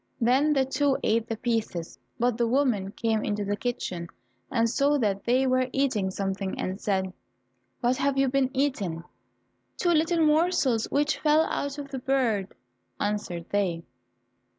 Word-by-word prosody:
Then 265 +5 +3
the 270 -2 +2
two 275 +1 +1
ate 225 +1 +1
the 225 - -2
pieces, 220 -8 -2 0.2
but 240 0 +2
the 235 0 +1
woman 235 -7 +1
came 220 -2 0
into 205 0 -1
the 205 +1 0
kitchen 195 -7 -3 0.4
and 230 0 +2
saw 280 +5 +2
that 200 -6 -1
they 255 +3 +3
were 255 0 +2
eating 255 -9 0
something 195 0 -3
and 190 +2 -3
said, 190 -2 -1 0.7
"What 250 +1 +2
have 275 0 0
ye 270 - +4
been 265 0 +1
eating?" 225 - -1 0.7
"Two 350 - +2
little 330 0 +3
morsels 300 -7 +2
which 290 +1 +1
fell 305 0 +4
out 285 -2 -3
of 280 -1 -7
the 265 - -3
bird," 245 -7 +1 0.5
answered 205 -5 -2
they. 180 -5 0
245 Hz, 155 wpm, -27 LUFS, 205-275 Hz, 0.7 s, ye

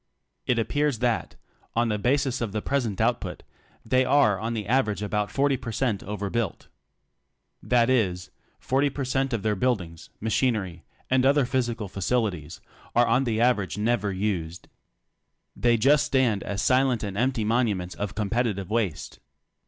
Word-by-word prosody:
It 125 - +2
appears 145 +3 0
that, 120 0 -1 0.4
on 120 0 +2
the 105 -1 -1
basis 130 +2 +1
of 110 -4 -3
the 105 - -1
present 120 -8 -1
output, - - -1 0.4
they 130 +3 +3
are 125 -8 +3
on 115 +2 -3
the 105 -2 -3
aver 120 0 +2
age 105 - -6
about 105 0 -1
40 140 +3 +1
per 115 - -6
cent 110 -3 -1
over 100 0 -4
built. 115 -6 -3 0.9
That 120 -2 +2
is, 95 -9 0 0.3
40 130 - +1
per 135 0 -4
cent 135 +1 0
of 115 -5 -2
their 110 -1 +1
buildings, 95 -8 -2
machinery 105 -6 -1 0.3
and 130 0 +4
other 140 0 +4
physical 120 -4 -1
facilities 95 -5 -2 0.3
are 120 +1 +5
on 120 +4 +2
the 110 -2 0
average 105 -8 +1
never 105 -1 0
used. 90 -4 -3 0.9
They 120 -1 +2
just 140 +6 +4
stand 120 -7 +2
as 100 0 -3
silent 130 -3 +2
and 100 -2 -4
empty 125 +1 0
monuments 105 -5 0
of 100 -2 -5
competitive 105 -2 -1
waste. 110 -8 -2
115 Hz, 160 wpm, -26 LUFS, 100-125 Hz, 0.9 s, are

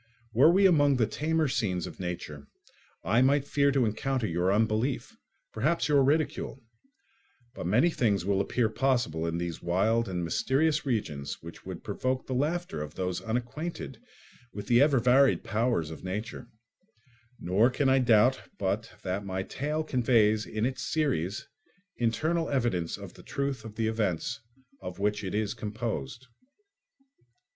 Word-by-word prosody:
Were 130 +7 +6
we 195 +3 +4
among 145 -6 +5
the 115 - +3
tamer 160 +5 0
scenes 90 -9 -1
of - - -9
nature 85 -6 -6 0.6
I 115 +2 +3
might 140 +2 +3
fear 140 0 +2
to 135 -3 +2
encounter 125 +3 -1
your 90 0 +1
unbelief, 110 +5 0 0.4
perhaps 145 +6 +1
your 145 -2 +4
ridicule; 145 -1 0 0.9
but - - -5
many 125 - +3
things 105 - +1
will 100 -1 +2
appear 115 +3 +1
possible 110 -10 0
in 85 0 -2
these 85 -1 -4
wild 105 +6 +1
and 90 -2 -2
mysterious 145 - +1
regions 75 - -2
which 85 +2 -11
would 90 -3 -7
provoke 130 +5 -2
the 130 - -4
laughter 150 - -1
of 75 0 -7
those 90 -1 -2
unacquainted 125 +9 -4 0.5
with 100 0 -7
the 120 +3 +4
ever 145 -1 +4
varied 130 +3 +4
powers 110 -8 0
of 80 - -9
nature; 105 +4 -5 0.9
nor 100 +8 +3
can 135 +2 0
I 135 0 +4
doubt 120 +1 +4 0.2
but 100 +3 -2
that 95 +2 -2
my 95 -1 -3
tale 150 +8 -3
conveys 115 -6 +2
in 110 +1 -2
its 130 +1 -2
series 105 - -1 0.5
internal 155 +9 0
evidence 115 -11 0
of - - -10
the - - -14
truth 140 -3 -3
of 110 -1 -9
the 115 - -1
events 105 -7 -1 0.4
of 90 -1 -7
which 105 +1 -1
it 95 +1 -3
is 105 -1 0
composed." 110 - -5
115 Hz, 150 wpm, -28 LUFS, 95-135 Hz, 0.9 s, Were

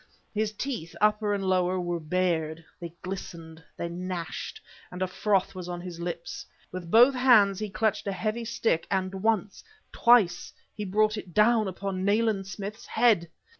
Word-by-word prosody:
His 215 0 0
teeth, 215 -7 -5
upper 210 0 +2
and 200 -1 -1
lower, 185 -1 +1
were 175 -1 -2
bared; 165 -1 -1
they 170 -1 -8
glistened, 165 -4 -7
they 170 - -3
gnashed, 175 -1 -5 0.3
and 180 - -8
a - - +2
froth 195 +1 0
was 180 -2 -7
on 175 0 -4
his 175 -1 -8
lips. 170 -1 -5 0.3
With 180 -2 -7
both 240 +7 +7
his 250 - -4
hands, 205 -7 +5
he 215 -1 -3
clutched 215 +1 0
a - - 0
heavy 215 +4 -2
stick, 225 -7 0
and 190 -1 -1
once 205 0 -1 0.3
twice, 215 -8 +3 0.2
he 210 - -5
brought 215 +3 +2
it 185 -5 -9
down 215 0 +4
upon 190 0 -4
Nayland 205 -1 +1
Smith's 200 +3 -7
head! 210 -9 +3
190 Hz, 170 wpm, -27 LUFS, 175-215 Hz, 0.3 s, both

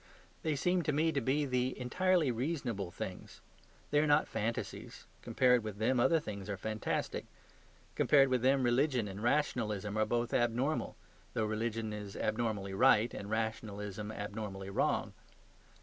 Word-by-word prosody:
They 155 -2 0
seem 180 +6 +1
to 155 - 0
me 155 +3 +2
to 140 - 0
be 145 +3 +1
the 125 -1 -1
entirely 170 +3 +2
reasonable 120 - -2
things. - - -7 0.5
They 145 - +4
are 155 - +2
not 145 +1 +4
fantasies: 115 +1 -4 0.2
compared 125 -2 +3
with 105 -2 -5
them 120 +4 +2
other 165 +7 +4
things 100 -8 -7
are 100 - -2
fantastic. 110 +3 -3 0.7
Compared 140 -2 +5
with 130 -2 +1
them 135 +1 +3
religion 125 -1 +2
and 100 +1 -7
rationalism 110 -6 0
are 110 - +3
both 120 +1 -1
abnormal, 120 +5 0 0.4
though 110 - +1
religion 110 0 -2
is 105 -1 -7
abnormally 110 -3 -1
right 115 +1 +4
and 100 - -6
rationalism 105 -2 -3
abnormally 105 -2 -5
wrong. - - 0
115 Hz, 150 wpm, -33 LUFS, 105-135 Hz, 0.7 s, Compared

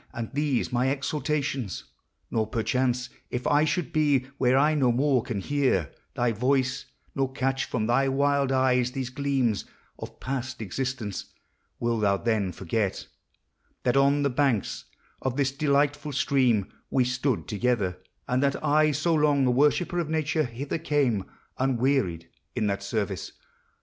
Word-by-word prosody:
And 115 -1 -5
these 145 -3 0
my 125 +2 +2
exhortations! 140 -4 -2 0.5
Nor. 110 -1 0
perchance, 125 +1 0
— - - -39
If 125 - -7
I 145 +1 +4
should 175 -4 -1
be 145 -4 +3 0.2
where 130 0 +4
I 150 +3 +4
no 135 -5 +3
more 130 +1 +2
can 110 -3 -4
hear 130 - +1 0.2
Thy 120 -1 +1
voice, 130 +3 0 0.3
nor 135 -1 -1
catch 135 0 -1
from 110 -3 -2
thy 125 +4 +2
wild 140 0 +2
eyes 125 -1 +2
these 130 -2 -3
gleams 135 -6 0 0.3
Of - - -9
past 130 -1 -4
existence, 110 0 -3 0.3
— - - -46
wilt 115 -2 0
thou 100 -1 +3
then 105 -4 0
forget 95 +3 -2 0.8
That 125 - +2
on 140 +1 +4
the 140 - +1
banks 125 -5 0 0.4
of 130 0 -2
this 135 -2 +2
delightful 145 0 +1
stream 125 -7 +2 0.2
We 130 - +3
stood 125 0 -1
together; 105 -5 0 0.3
and 125 +1 +1
that 140 0 0
I, 155 +1 +4
so 160 +4 +1
long 150 -3 +3
A 125 - +3
worshipper 150 +7 +2
of 165 -3 -2
Nature, 155 -1 0
hither 130 +6 -4
came 135 -11 +1 0.3
Unwearied 130 - +1 0.3
in - - 0
that 100 -1 -1
service? 100 -1 -3
130 Hz, 155 wpm, -26 LUFS, 120-140 Hz, 0.8 s, I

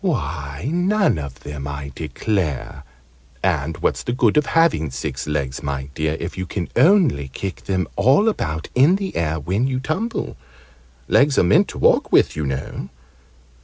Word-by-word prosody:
Why, 75 - -2
none 190 - +2
of 70 -3 -7
them, 75 -1 -6
I 70 -1 -6
declare! 85 - -3 0.6
And 80 -4 0
what's - - +1
the 120 - -3
good 120 -4 +2
of 150 - +3
having 165 - +2
six 65 +2 -4
legs, 70 -3 -2
my 70 -1 -4
dear, 80 +1 -1
if 90 +2 -5
you 95 - -3
can 90 -3 -4
only 160 - +4
kick 95 +8 -6
them 95 -4 0
all 135 - +4
about 80 - -1
in 140 +9 +5
the 195 -1 -4
air 80 -1 0
when 95 - 0
you 130 -1 -1
tumble? 185 - -3 0.7
Legs 140 -1 +4
are - - +5
meant 85 - +4
to - - -8
walk - - +3
with, - - +4
you 75 -2 -2
know. 65 0 -4
85 Hz, 165 wpm, -21 LUFS, -, 0.7 s, in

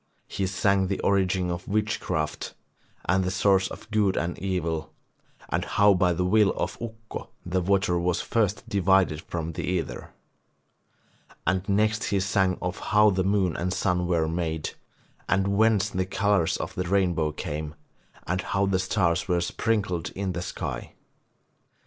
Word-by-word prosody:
He 95 - -2
sang 100 0 +2
the 100 - -2
origin 95 -2 +1
of 85 +1 -5
witchcraft, 105 -7 -2 0.5
the 90 +1 +2
source 95 0 +3
of 110 - -11
good 105 -3 +2
and 85 +1 -1
evil 85 -4 -2 0.6
and - - 0
how 100 0 +4
by 90 -1 +3
the 90 +1 0
will 105 +2 +4
of - - -3
Ukko 110 -1 -7 0.2
the 90 +1 0
water 95 -1 +2
was 90 0 0
first 105 -3 0
divided 95 -5 +2
from 85 -1 -4
the 80 - -5
ether. 90 -2 -3 1.4
And 95 +1 0
next 110 +2 +2
he 100 - +1
sang 95 -1 +1
of 90 0 -3
how 105 0 +4
the 95 -1 +1
moon 95 -3 +1
and 90 +1 -2
sun 90 -2 0
were 85 -3 +1
made, 80 -1 -2 0.6
and 95 0 +2
whence 110 -2 +3
the 95 0 -1
colours 100 -3 +1
of - - -5
the 90 - -2
rainbow 90 -4 +1
came, 75 0 -5 0.5
and 90 +2 -1
how 100 0 0
the 95 -1 +1
stars 95 -3 +1
were 90 -2 +2
sprinkled 95 -2 -1
in 95 -1 -2
the 85 0 -3
sky. - - -5
95 Hz, 155 wpm, -26 LUFS, 90-100 Hz, 1.4 s, how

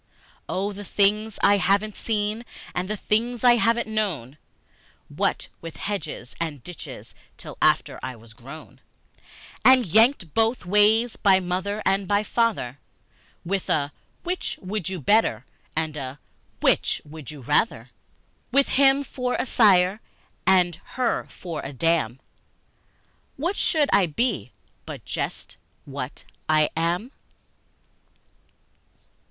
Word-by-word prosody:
Oh, 200 +2 -1
the 205 +1 -8
things 210 +2 +1
I 205 - +6
haven't 200 +2 +1
seen 215 +1 -2 0.3
and 180 +2 -2
the 215 - -2
things 230 +4 -1
I 240 -1 +7
haven't 230 0 +2
known, 170 - -2 0.7
What - - -1
with 165 -1 -8
hedges 170 -10 -5
and 150 -6 -4
ditches 180 -3 -9 0.2
till - - -9
after - - +2
I 130 -1 -5
was 115 0 -15
grown, 135 +7 -12 0.8
And 260 -2 +7
yanked 215 - +3
both 225 -1 +1
ways 210 +5 +3
by 195 -2 +5
my 185 - -7
mother 195 +4 -2
and 195 0 +1
my 205 +2 +2
father, 210 - 0 0.7
With 195 +2 -2
a 145 -1 +1 0.3
'Which 360 +1 -2
would 190 -1 -3
you 190 -2 -4
better?" 140 - +2 0.3
and 155 -1 -1
a 135 -1 -6 0.4
"Which - - +2
would 150 -2 -10
you 150 -2 -9
rather?" 150 - 0 0.6
With 275 0 +3
him 275 +1 +4
for 250 -2 -2
a - - -1
sire 200 -4 +4 0.5
and 180 -3 +4 0.2
her 255 -2 0
for 170 -3 -6
a 140 - -7
dam, 150 -4 +1 1.2
What 340 +8 -1
should 305 -7 +2
I 190 -3 +5
be 150 - -1 0.4
but - - -8
just - - -4 0.3
what 140 -1 -6 0.3
I 155 -1 +3
am? 175 +9 -1
195 Hz, 130 wpm, -24 LUFS, 155-220 Hz, 1.2 s, I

